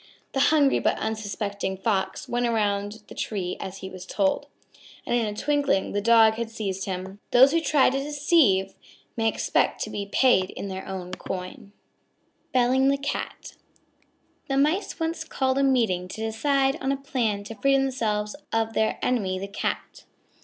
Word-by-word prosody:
The 270 Hz, -, 0 dB
hungry 290 Hz, -3 st, +4 dB
but -, -, +1 dB
unsuspecting 205 Hz, -3 st, -3 dB
Fox, 195 Hz, -1 st, -1 dB
went 240 Hz, 0 st, 0 dB
around 205 Hz, -1 st, -1 dB
the -, -, -10 dB
tree 185 Hz, -4 st, -3 dB
as 190 Hz, +1 st, -7 dB
he -, -, -5 dB
was 185 Hz, -1 st, -8 dB
told, 190 Hz, +1 st, 0 dB, 0.6 s
and -, -, -2 dB
in 235 Hz, -2 st, +1 dB
a 210 Hz, -, -4 dB
twinkling 285 Hz, -9 st, +1 dB
the 205 Hz, -, -1 dB
Dog 225 Hz, 0 st, +6 dB
had 235 Hz, -1 st, -3 dB
seized 200 Hz, -4 st, -4 dB
him. 190 Hz, 0 st, -5 dB
Those 260 Hz, +3 st, +7 dB
who 330 Hz, +1 st, +2 dB
try 290 Hz, -5 st, +3 dB
to 270 Hz, -, -1 dB
deceive 280 Hz, -, +2 dB, 0.4 s
may 225 Hz, -1 st, +1 dB
expect -, -, +1 dB
to -, -, -6 dB
be 200 Hz, -1 st, -4 dB
paid 215 Hz, -8 st, +4 dB
in 200 Hz, -, -6 dB
their 190 Hz, 0 st, -6 dB
own 185 Hz, -2 st, -6 dB
coin. 185 Hz, +2 st, -6 dB, 0.8 s
BELLING 255 Hz, +1 st, +3 dB
THE 275 Hz, 0 st, +3 dB
CAT 280 Hz, +1 st, -5 dB, 0.9 s
The 270 Hz, -, 0 dB
Mice 310 Hz, +10 st, +1 dB
once 325 Hz, 0 st, -2 dB
called 265 Hz, -3 st, 0 dB
a -, -, +3 dB
meeting 225 Hz, -10 st, +2 dB
to 220 Hz, +4 st, -7 dB
decide 270 Hz, +5 st, +1 dB
on 265 Hz, -, 0 dB
a 275 Hz, -, 0 dB
plan 235 Hz, -7 st, -1 dB
to 210 Hz, -, -7 dB
free 275 Hz, +4 st, +2 dB
themselves 220 Hz, -6 st, -1 dB, 0.2 s
of 225 Hz, 0 st, 0 dB
their 220 Hz, 0 st, +1 dB
enemy, 200 Hz, -7 st, 0 dB
the 195 Hz, +1 st, -5 dB
Cat. 200 Hz, -, -4 dB
225 Hz, 170 wpm, -25 LUFS, 200-270 Hz, 0.9 s, Those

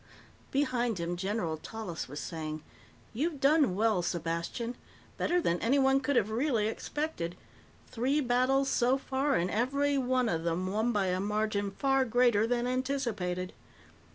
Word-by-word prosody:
Behind 245 Hz, -5 st, 0 dB
him, 170 Hz, +1 st, -2 dB
General 190 Hz, -3 st, -2 dB
Tallis 190 Hz, -1 st, -6 dB
was 145 Hz, +3 st, -7 dB
saying, 155 Hz, -2 st, -5 dB, 0.5 s
"You've 295 Hz, +5 st, -1 dB
done 280 Hz, -, +4 dB
well, 215 Hz, -2 st, +2 dB
Sepastian. 170 Hz, +7 st, -2 dB, 0.4 s
Better 355 Hz, -, +1 dB
than 175 Hz, -, 0 dB
anyone 270 Hz, +2 st, +3 dB
could 275 Hz, +1 st, -1 dB
have 215 Hz, -3 st, +2 dB
really 235 Hz, -2 st, +1 dB
expected. 220 Hz, -, -3 dB, 0.5 s
Three 260 Hz, +5 st, 0 dB
battles 260 Hz, +1 st, +2 dB
so 250 Hz, +1 st, +2 dB
far, 275 Hz, +1 st, 0 dB
and 175 Hz, +2 st, 0 dB
every 280 Hz, +5 st, +1 dB
one 255 Hz, -1 st, +1 dB
of 165 Hz, -5 st, -1 dB
them 170 Hz, +2 st, -1 dB
won 215 Hz, +5 st, 0 dB
by 200 Hz, -4 st, +1 dB
a 180 Hz, 0 st, 0 dB
margin 210 Hz, 0 st, 0 dB
far 270 Hz, +6 st, +2 dB
greater 240 Hz, -3 st, +3 dB
than 240 Hz, 0 st, 0 dB
anticipated. 240 Hz, -9 st, -2 dB
230 Hz, 145 wpm, -30 LUFS, 185-265 Hz, 0.5 s, done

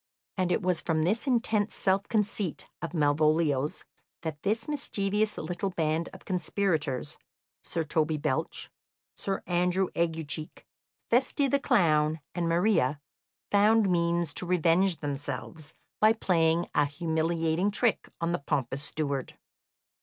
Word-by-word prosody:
And 185 Hz, -2 st, 0 dB
it 195 Hz, -, +1 dB
was 180 Hz, -2 st, +1 dB
from 160 Hz, -2 st, 0 dB
this 215 Hz, -, 0 dB
intense 225 Hz, -4 st, +1 dB
self 195 Hz, +1 st, +1 dB
conceit 210 Hz, -5 st, -1 dB
of 170 Hz, -, -4 dB
Malvolio's 150 Hz, -1 st, +2 dB, 0.4 s
that 155 Hz, -3 st, -4 dB
this 215 Hz, +7 st, -1 dB
mischievous 210 Hz, -7 st, -1 dB
little 180 Hz, +3 st, -3 dB
band 165 Hz, -2 st, -1 dB
of -, -, -13 dB
conspirators 170 Hz, -7 st, -1 dB, 0.4 s
Sir 165 Hz, -, -2 dB
Toby 155 Hz, 0 st, 0 dB
Belch, 145 Hz, -3 st, -2 dB, 0.4 s
Sir 195 Hz, -1 st, -3 dB
Andrew 180 Hz, +1 st, +1 dB
Aguecheek, 160 Hz, -2 st, -3 dB, 0.5 s
Feste 265 Hz, +3 st, +2 dB
the 280 Hz, -, +3 dB
clown, 160 Hz, -, +3 dB
and 170 Hz, -1 st, -1 dB
Maria 170 Hz, -6 st, +2 dB, 0.5 s
found 210 Hz, 0 st, +4 dB
means 170 Hz, -2 st, +1 dB
to 180 Hz, -, -3 dB
revenge 175 Hz, 0 st, +2 dB
themselves 145 Hz, +2 st, -5 dB, 0.2 s
by 215 Hz, +1 st, +6 dB
playing 170 Hz, -5 st, +2 dB
a 145 Hz, -, +3 dB
humiliating 165 Hz, +3 st, 0 dB
trick 220 Hz, +2 st, 0 dB
on 170 Hz, 0 st, 0 dB
the 175 Hz, -, 0 dB
pompous 135 Hz, -1 st, -2 dB
steward. 140 Hz, -3 st, -3 dB
170 Hz, 125 wpm, -28 LUFS, 155-195 Hz, 0.5 s, by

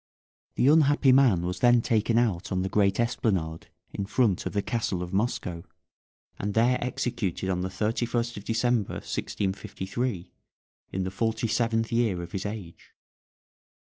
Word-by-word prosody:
The 125 Hz, -, +3 dB
unhappy 145 Hz, -2 st, +5 dB
man 125 Hz, -10 st, +4 dB
was 90 Hz, +1 st, -3 dB
then 120 Hz, -1 st, +5 dB
taken 115 Hz, 0 st, +1 dB
out 105 Hz, -7 st, 0 dB
on 95 Hz, -, 0 dB
to -, -, +1 dB
the 95 Hz, -, -2 dB
great 100 Hz, 0 st, +2 dB
esplanade 95 Hz, -9 st, -1 dB, 0.3 s
in 100 Hz, -, -3 dB
front 105 Hz, -4 st, +1 dB
of -, -, -5 dB
the 100 Hz, -1 st, 0 dB
castle 100 Hz, -6 st, -1 dB
of 90 Hz, -, -7 dB
Moscow, 95 Hz, -5 st, -1 dB, 0.8 s
and 100 Hz, +1 st, -3 dB
there 120 Hz, +3 st, +3 dB
executed 100 Hz, -7 st, -2 dB
on 90 Hz, -1 st, -1 dB
the 95 Hz, -, -2 dB
31st 115 Hz, +4 st, -1 dB
of 100 Hz, -, -7 dB
December, 115 Hz, -1 st, 0 dB
1653, 95 Hz, +1 st, -3 dB, 0.6 s
in 95 Hz, -, -2 dB
the 95 Hz, -, -3 dB
forty 110 Hz, +3 st, -1 dB
seventh 115 Hz, 0 st, 0 dB
year 110 Hz, -7 st, +1 dB
of 85 Hz, -, -9 dB
his 95 Hz, +1 st, -3 dB
age. 100 Hz, -6 st, -9 dB
110 Hz, 155 wpm, -27 LUFS, 95-120 Hz, 0.8 s, unhappy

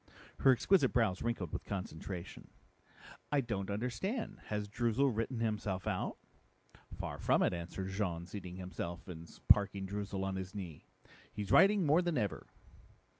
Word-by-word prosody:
Her 135 Hz, -, +7 dB
exquisite 135 Hz, +4 st, +4 dB
brows 110 Hz, -7 st, +2 dB
wrinkled 110 Hz, -9 st, -2 dB
with -, -, -3 dB
concentration. 95 Hz, -1 st, -6 dB, 0.8 s
"I 145 Hz, -, +4 dB
don't 105 Hz, -7 st, -2 dB
understand. 125 Hz, -, -2 dB
Has 105 Hz, -1 st, -2 dB
Droozle 120 Hz, +4 st, +1 dB
written 115 Hz, +2 st, -1 dB
himself 105 Hz, -4 st, -1 dB
out?" -, -, -1 dB, 0.8 s
"Far -, -, -4 dB
from -, -, +3 dB
it," -, -, +2 dB
answered 90 Hz, +2 st, -4 dB
Jean, 95 Hz, -4 st, -2 dB
seating 90 Hz, -1 st, -7 dB
himself 90 Hz, -2 st, -5 dB
and 85 Hz, -2 st, -8 dB, 0.2 s
parking 100 Hz, -1 st, +5 dB
Droozle 100 Hz, 0 st, -3 dB
on 95 Hz, 0 st, -2 dB
his 95 Hz, +2 st, -6 dB
knee. 90 Hz, -7 st, -7 dB, 0.4 s
"He's 100 Hz, -2 st, -4 dB
writing 195 Hz, -, +6 dB
more 155 Hz, +4 st, +5 dB
than 175 Hz, -4 st, 0 dB
ever." 105 Hz, -5 st, -1 dB
100 Hz, 145 wpm, -35 LUFS, 95-120 Hz, 0.8 s, Her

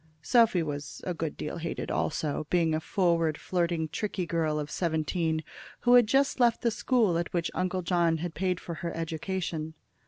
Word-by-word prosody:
Sophy 230 Hz, -8 st, +4 dB
was 145 Hz, -2 st, -5 dB
a 180 Hz, -, -2 dB
good 160 Hz, -2 st, -4 dB
deal 150 Hz, -, -4 dB
hated 165 Hz, 0 st, -4 dB
also, 155 Hz, -1 st, -1 dB
being 165 Hz, -3 st, +2 dB
a 155 Hz, -, +1 dB
forward, 165 Hz, -3 st, +1 dB
flirting, 170 Hz, -3 st, -1 dB
tricky 185 Hz, +3 st, -3 dB
girl 160 Hz, -2 st, 0 dB
of 150 Hz, 0 st, -5 dB
seventeen, 160 Hz, -1 st, 0 dB, 0.4 s
who 245 Hz, -, +4 dB
had 245 Hz, -3 st, +7 dB
just 270 Hz, +3 st, +2 dB
left 235 Hz, -2 st, +3 dB
the 235 Hz, -, +3 dB
school 220 Hz, -7 st, +2 dB
at 170 Hz, -, -3 dB
which 170 Hz, -1 st, 0 dB
Uncle 185 Hz, 0 st, -1 dB
John 170 Hz, -2 st, +2 dB
had 170 Hz, +1 st, -4 dB
paid 185 Hz, -1 st, -1 dB
for 170 Hz, -, -6 dB
her 170 Hz, -, -2 dB
education. 165 Hz, -1 st, -3 dB
170 Hz, 180 wpm, -29 LUFS, 160-185 Hz, 0.4 s, had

